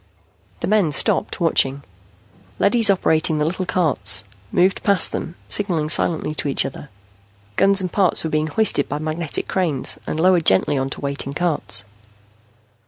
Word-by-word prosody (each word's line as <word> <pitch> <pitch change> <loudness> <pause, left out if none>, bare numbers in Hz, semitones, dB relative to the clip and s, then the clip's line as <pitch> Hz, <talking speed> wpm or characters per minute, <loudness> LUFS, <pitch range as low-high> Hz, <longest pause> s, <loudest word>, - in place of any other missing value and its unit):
The - - -2
men 200 -6 +2
stopped, 145 - 0
watching. 140 -5 0 0.7
Leadys 225 +1 +3
operating 160 -5 +1
the 150 - 0
little 185 +3 -3
carts 160 -11 +1 0.3
moved 185 +2 +1
past 200 -4 +3
them, 170 - -5
signaling 170 -7 -1
silently 155 0 +2
to 150 - -3
each 140 - 0
other. 135 +1 -8 0.7
Guns 195 - +4
and 185 -2 -4
parts 190 -4 +2
were 160 - -4
being 155 0 0
hoisted 155 -3 +1
by 145 - -3
magnetic 155 +1 -3
cranes 165 -8 -1
and 155 - -3
lowered 180 -1 +2
gently 95 +9 +3
onto 135 0 -3
waiting 140 0 -5
carts. 160 - 0
160 Hz, 150 wpm, -20 LUFS, 145-185 Hz, 0.7 s, Guns